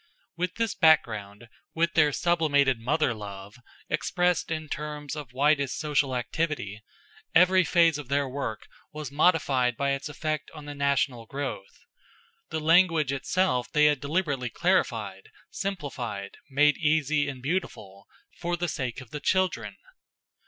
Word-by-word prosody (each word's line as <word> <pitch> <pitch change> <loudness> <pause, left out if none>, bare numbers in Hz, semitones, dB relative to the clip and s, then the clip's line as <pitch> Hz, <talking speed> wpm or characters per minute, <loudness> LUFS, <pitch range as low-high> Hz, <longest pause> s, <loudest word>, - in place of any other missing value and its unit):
With 180 +2 -2
this 230 -2 -1
background, 110 - +2 0.3
with 170 +1 +1
their 150 -2 +4
sublimated 145 -6 +2
mother 135 +2 +1
love, 100 -1 -9 0.3
expressed 180 -1 0
in 155 -1 -3
terms 150 0 -5
of 145 -5 -7
widest 140 +1 +1
social 145 -3 0
activity, 125 -5 -3 0.5
every 185 +2 +6
phase 165 -3 +3
of 145 - -8
their 140 +1 +1
work 130 -5 -4 0.3
was 150 -1 -6
modified 140 -6 +2
by 140 0 0
its 135 +2 -3
effect 155 0 -3
on 150 -1 -9
the 145 - -6
national 140 -4 0
growth. 480 - -6 0.7
The 160 - -2
language 165 -2 +4
itself 140 -1 0
they 150 0 +4
had 150 -2 +3
deliberately 145 -4 -1
clarified, 115 - -1 0.2
simplified, 130 - -5
made 145 +2 +4
easy 155 -2 +1
and 135 -2 -7
beautiful, 125 - -4 0.3
for 175 0 -2
the 175 +1 -1
sake 130 -5 -4
of 125 - -14
the 150 - -5
children. 185 +4 0
145 Hz, 140 wpm, -27 LUFS, 130-165 Hz, 0.7 s, every